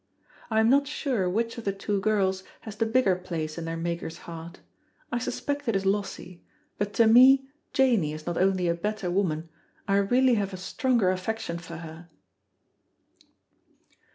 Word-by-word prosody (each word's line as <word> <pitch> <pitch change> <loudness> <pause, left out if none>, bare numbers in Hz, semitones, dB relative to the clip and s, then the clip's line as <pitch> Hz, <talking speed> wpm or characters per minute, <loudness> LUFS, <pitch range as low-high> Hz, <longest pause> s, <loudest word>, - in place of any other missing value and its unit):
I 220 -1 +2
am 220 - +4
not 280 +3 +4
sure 255 -10 -1
which 230 +5 -1
of - - -8
the 200 - 0
two 200 +1 -2
girls 190 -3 +1 0.2
has 215 -3 -8
the 225 +1 0
bigger 220 -5 +3
place 165 -3 -5
in 165 - -5
their 165 0 -3
maker's 170 0 -4
heart; 170 +1 -9 0.5
I 240 - 0
suspect 285 +3 -3
it 230 - +1
is 195 0 0
Lossie; 195 -3 -2 0.4
but 205 0 -1
to 230 - +5
me 260 +4 +7 0.3
Janey 235 - +2
is 155 0 -8
not 175 - -2
only 185 -1 +2
a 170 - +2
better 200 +1 -3
woman, 165 -4 -1 0.4
I 195 - +3
really 245 +6 +3
have 195 -1 -4
a - - -7
stronger 225 +1 +1
affection 185 -1 -3
for 170 0 -9
her. 165 +1 -10
195 Hz, 170 wpm, -27 LUFS, 170-230 Hz, 0.5 s, me